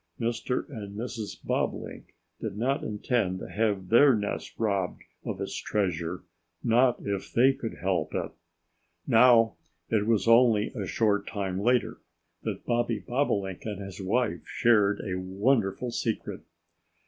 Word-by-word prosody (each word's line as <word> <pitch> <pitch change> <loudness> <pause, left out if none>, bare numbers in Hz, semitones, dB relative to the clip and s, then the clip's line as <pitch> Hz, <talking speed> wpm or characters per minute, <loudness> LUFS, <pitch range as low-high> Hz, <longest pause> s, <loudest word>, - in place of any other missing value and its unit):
Mr. 120 +2 -1
and 105 -6 -8
Mrs. 115 -2 -5
Bobolink - - -3 0.2
did 105 -3 -5
not 130 +5 0
intend 105 -3 -1
to - - -7
have 100 -4 -1
their 130 +3 +6
nest 105 -1 -4
robbed 100 -5 -1 0.2
of - - -4
its - - -4
treasure 90 -4 -2 0.4
not 120 +2 +3
if 100 -1 -3
they 130 +3 +5
could 115 -4 -6
help 90 -4 -1
it! - - -2 0.7
Now, 115 -1 +5 0.3
it 105 -2 +1
was 110 -3 +2
only 115 -2 +5
a 105 -7 -4
short 105 -1 +1
time 95 -3 -3
later 120 +3 +1 0.4
that - - -5
Bobby 120 -1 +1
Bobolink 100 -8 -1
and 105 -3 -4
his 100 -1 -7
wife 115 +5 0
shared 105 -4 +2
a 95 -3 -3
wonderful 100 +4 0
secret. 115 -1 -3
110 Hz, 135 wpm, -28 LUFS, 100-120 Hz, 0.7 s, their